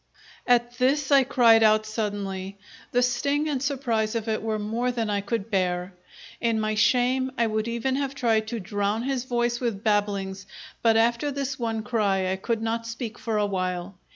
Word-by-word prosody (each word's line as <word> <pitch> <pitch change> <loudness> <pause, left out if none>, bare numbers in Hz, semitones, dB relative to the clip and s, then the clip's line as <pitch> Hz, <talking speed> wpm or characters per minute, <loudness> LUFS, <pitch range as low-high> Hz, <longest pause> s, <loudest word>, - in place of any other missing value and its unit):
At 240 0 +2
this 275 +2 +2
I 275 -1 +7
cried 230 -3 +5
out 215 0 +4
suddenly. 200 -3 -4 0.3
The 245 0 +3
sting 280 +5 0
and 280 -4 -1
surprise 240 -6 -1
of 230 0 -2
it 220 -1 -1
were 220 -1 -1
more 225 +4 -1
than 230 -3 -2
I 200 -1 0
could 220 +1 -3
bear. 180 -1 0 0.5
In 230 -2 +1
my 215 0 0
shame 255 +4 +2
I 235 - +3
would 215 0 -1
even 235 +3 -1
have 275 -1 -2
tried 225 -4 +1
to 230 +1 -3
drown 205 +3 -1
his 260 -1 -2
voice 240 -1 0
with 225 -5 -3
babblings 200 -2 -1 0.3
but 225 -1 +4
after 235 +5 +2
this 275 -1 -3
one 225 -2 -2
cry 195 -5 0
I 190 - -1
could 225 +3 -2
not 230 0 -2
speak 230 0 -6
for 225 -4 -2
a 210 - +2
while. 185 -1 -2
225 Hz, 185 wpm, -25 LUFS, 205-245 Hz, 0.5 s, I